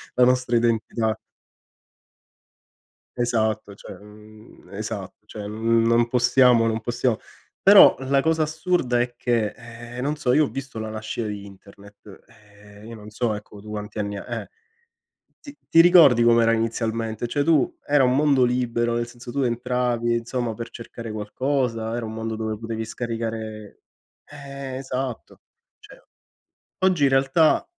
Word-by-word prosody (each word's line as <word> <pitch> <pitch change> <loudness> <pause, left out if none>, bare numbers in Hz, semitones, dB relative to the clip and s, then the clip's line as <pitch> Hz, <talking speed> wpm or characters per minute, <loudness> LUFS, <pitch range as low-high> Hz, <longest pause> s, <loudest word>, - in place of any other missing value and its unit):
la 125 0 +5
nostra 125 -1 +1
identità. 115 -1 0 2.0
Esatto, 110 -4 -1
cioè, - - -11
mhmm, 105 +1 -17
esatto, 105 -1 -7
cioè 105 -2 -8
non 115 +2 +2
possiamo 125 -1 +4
non 110 0 -1
possiamo 120 0 -1 0.4
però, - - +8
la 135 +1 +1
cosa 160 0 +1
assurda 155 -6 0
è 120 0 -2
che, 115 -4 0 0.5
eh, - - -2
non 145 +3 -1
so, 125 -4 0
io 155 +2 +4
ho - - -6
visto 135 -4 -7
la 110 0 -4
nascita 110 +1 -5
di 105 -1 -6
internet, 100 +1 -15
eh, 105 0 -18
io 115 - -9
non 105 -1 -11
so 110 0 -1
ecco 105 0 -10
tu 105 - -13
quanti 105 0 -6
anni 100 -1 -3
ha - - -7 0.2
eh. - - -11 0.9
Ti 285 -2 -12
ti 165 - +7
ricordi 165 -9 +6
com'era 115 -1 +4
inizialmente? 115 0 -2
Cioè 145 +4 -1
tu 155 -4 +2
era 145 -2 +3
un 125 0 +3
mondo 140 -3 +3
libero, 120 -1 0
nel 120 0 -2
senso, 120 0 -11
tu 140 - -2
entravi, 120 -1 0
insomma, 120 0 -3
per 115 +2 -7
cercare 115 -1 -9
qualcosa, 115 +1 -2
era 120 -1 -3
un 110 - -6
mondo 110 0 -4
dove 110 -1 -4
potevi 115 0 -5
scaricare 110 -2 -6 0.4
eh, 140 -2 -8
esatto. 130 -2 -5 0.4
Cioè - - -16 0.8
oggi 185 -6 +2
in - - +5
realtà 135 +4 +3
115 Hz, 150 wpm, -23 LUFS, 110-130 Hz, 2.0 s, però